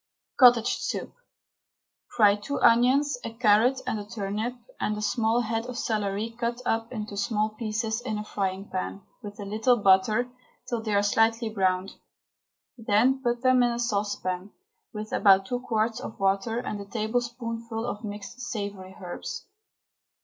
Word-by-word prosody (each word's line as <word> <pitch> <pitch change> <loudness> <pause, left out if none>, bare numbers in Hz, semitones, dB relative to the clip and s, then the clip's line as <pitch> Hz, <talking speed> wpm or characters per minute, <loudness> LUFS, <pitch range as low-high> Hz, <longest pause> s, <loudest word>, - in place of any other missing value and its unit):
COTTAGE 245 -3 +6
SOUP. - - -4 0.9
Fry 205 -3 +4
two 245 +8 -4
onions, 255 +4 +4
a 230 - -4
carrot 230 +3 +3
and 220 -4 -1
a - - -5
turnip, 210 +3 -3 0.2
and 210 - -1
a - - -4
small 230 +1 +1
head 225 0 -2
of 250 -1 -6
celery 215 0 -2
cut 235 0 -1
up 225 0 -1
into 215 -4 -5
small 210 +1 0
pieces, 220 +1 -3
in 220 -4 -3
a 210 - -4
frying 195 -1 -3
pan, 95 +1 -4 0.2
with 205 0 -9
a 205 - -5
little 220 +5 +2
butter, 210 +4 +4 0.4
till 240 -3 -2
they 215 -2 -1
are 200 - +3
lightly 225 +1 +3
browned. 190 -2 0 0.8
Then 230 +5 +2
put 240 -1 -1
them 255 -1 +5
in 240 0 +3
a - - -3
saucepan, 205 -5 -2 0.4
with 215 0 -6
about 195 -2 +5
two 245 +5 -2
quarts 225 -1 -1
of 250 - -8
water 195 +4 +1
and 210 -4 -4
a - - -8
tablespoonful 230 +1 -3
of 210 -2 -5
mixed 205 +3 -7
savoury 200 -5 -5
herbs. 180 -2 -6
220 Hz, 155 wpm, -27 LUFS, 205-240 Hz, 0.9 s, COTTAGE